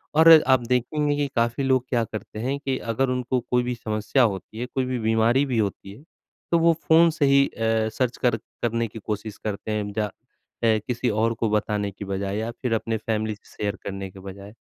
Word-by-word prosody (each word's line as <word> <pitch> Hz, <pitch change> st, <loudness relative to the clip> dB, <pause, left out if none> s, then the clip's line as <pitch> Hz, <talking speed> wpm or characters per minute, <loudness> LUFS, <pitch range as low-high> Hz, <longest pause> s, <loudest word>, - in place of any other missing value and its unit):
और 165 Hz, +1 st, +8 dB, 0.2 s
आप 130 Hz, -1 st, +5 dB
देखेंगे 145 Hz, +4 st, +1 dB
कि 145 Hz, -1 st, 0 dB
काफ़ी 115 Hz, +3 st, +1 dB
लोग 130 Hz, -1 st, +2 dB
क्या 120 Hz, -3 st, +1 dB
करते 110 Hz, -1 st, -7 dB
हैं 140 Hz, +2 st, 0 dB
कि 135 Hz, -2 st, -2 dB, 0.2 s
अगर 135 Hz, +3 st, +1 dB
उनको 125 Hz, 0 st, 0 dB
कोई 125 Hz, +1 st, 0 dB
भी 125 Hz, 0 st, -2 dB
समस्या 110 Hz, +4 st, 0 dB
होती 105 Hz, +1 st, -2 dB
है, 125 Hz, -, -2 dB
कोई 130 Hz, +1 st, -2 dB
भी 125 Hz, -1 st, -2 dB
बीमारी 115 Hz, +5 st, +3 dB
भी 125 Hz, -4 st, -1 dB
होती 100 Hz, -2 st, -2 dB
है, 135 Hz, -, -15 dB, 0.5 s
तो 170 Hz, -, +4 dB
वो 165 Hz, 0 st, +5 dB
फ़ोन 165 Hz, +1 st, +6 dB
से 150 Hz, -3 st, +1 dB
ही 140 Hz, 0 st, +5 dB
अ, 110 Hz, -1 st, 0 dB
सर्च 125 Hz, +2 st, -1 dB
कर 120 Hz, -2 st, +1 dB, 0.2 s
करने 115 Hz, 0 st, 0 dB
की 110 Hz, -, -10 dB
कोशिश 105 Hz, 0 st, -5 dB
करते 105 Hz, 0 st, -4 dB
हैं 105 Hz, -1 st, -2 dB
जा 110 Hz, 0 st, 0 dB, 0.6 s
अ, 110 Hz, -1 st, +4 dB
किसी 125 Hz, 0 st, -1 dB
और 110 Hz, +2 st, +1 dB
को 115 Hz, -, +1 dB
बताने 105 Hz, -1 st, 0 dB
की 100 Hz, +1 st, -8 dB
बजाए 100 Hz, +1 st, -3 dB
या 115 Hz, +2 st, -2 dB
फिर 125 Hz, -3 st, 0 dB
अपने 115 Hz, 0 st, -1 dB
फैमिली 110 Hz, 0 st, -2 dB
से -, -, -23 dB
शेयर 105 Hz, 0 st, -1 dB
करने 95 Hz, -1 st, -5 dB
के 95 Hz, -, -13 dB
बजाए। 100 Hz, +2 st, -10 dB
115 Hz, 215 wpm, -24 LUFS, 105-130 Hz, 0.6 s, और